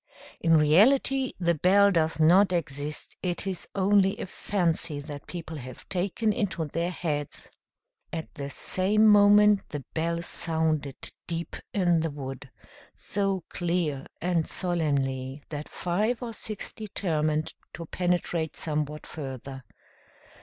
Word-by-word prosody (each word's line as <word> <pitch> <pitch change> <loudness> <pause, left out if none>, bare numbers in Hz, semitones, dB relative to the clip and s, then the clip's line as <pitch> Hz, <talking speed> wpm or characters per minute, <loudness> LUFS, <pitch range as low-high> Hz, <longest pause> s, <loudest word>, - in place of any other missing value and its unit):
In 165 -1 +4
reality 255 - +4
the 170 -1 +2
bell 200 +5 +5
does 160 -3 +1
not 180 +5 +6
exist; 150 -3 -3
it 180 0 -2
is 190 -2 -3
only 195 0 +3
a - - -3
fancy 170 -5 0
that 145 0 -8
people 165 -2 -6
have 130 -2 -9
taken 200 +4 0
into 185 -6 -1
their 165 +4 -2
heads!" 150 -5 -3 0.6
At 160 -1 -5
the 140 0 -5
same 200 +8 +1
moment 205 -1 +7
the 145 -3 -6
bell 170 +1 -1
sounded 160 -5 -1 0.3
deep 170 0 -4 0.2
in 175 -4 +3
the 165 0 0
wood, 135 -2 -7 0.5
so 195 -3 -1
clear 170 -6 -1
and 175 -2 0
solemnly 140 -6 -1
that 150 -1 -6
five 215 +8 -1
or 230 -1 -5
six 215 -1 -3
determined 155 -7 -1 0.2
to 170 - -7
penetrate 175 -2 -1
somewhat 150 -1 -3
further. 135 -2 -7
170 Hz, 125 wpm, -27 LUFS, 150-195 Hz, 0.6 s, moment